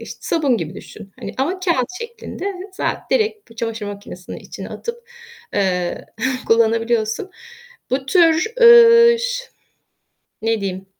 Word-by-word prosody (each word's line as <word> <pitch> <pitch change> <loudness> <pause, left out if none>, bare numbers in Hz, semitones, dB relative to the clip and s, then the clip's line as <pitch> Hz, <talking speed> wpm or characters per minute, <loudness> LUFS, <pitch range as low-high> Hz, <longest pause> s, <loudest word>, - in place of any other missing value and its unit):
işte - - -9
sabun 285 -7 +1
gibi 165 0 -5
düşün 200 -1 -12
hani - - -6
ama 360 +8 -1
kâğıt 335 -10 +1
şeklinde. 465 -4 -8 0.3
Za - - -2
direkt 435 - 0
bu 230 - -16
çamaşır 225 -2 -4
makinesinin 200 -3 -8
içine - - -9
atıp, 475 0 -7 0.5
ııı, 180 -3 -1 0.4
kullanabiliyorsun. 230 - +1 0.6
Bu 265 +1 -1
tür, 340 +5 +3
ııı, 470 0 +8
ş - - -3 1.0
ne 225 -1 0
diyeyim, 190 -1 -4
265 Hz, 125 wpm, -20 LUFS, -, 1.0 s, ııı